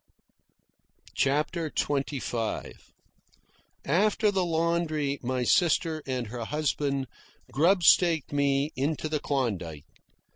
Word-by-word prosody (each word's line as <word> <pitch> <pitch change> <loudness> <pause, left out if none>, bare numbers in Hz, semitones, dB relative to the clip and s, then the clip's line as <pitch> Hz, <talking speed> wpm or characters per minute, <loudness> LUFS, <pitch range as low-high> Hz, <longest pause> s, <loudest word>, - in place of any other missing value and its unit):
CHAPTER 150 +4 0
XXV 135 -6 -2 1.1
After 205 +7 +2
the 190 -2 +1
laundry 160 -4 0
my 125 0 -1
sister 160 +1 +2
and 130 -2 -2
her 115 +1 -6
husband 140 -1 -1 0.5
grubstaked 170 - +4
me 140 +1 +1
into 150 +3 -1
the 155 -1 -1
Klondike. 95 - -3
145 Hz, 85 wpm, -27 LUFS, 135-165 Hz, 1.1 s, grubstaked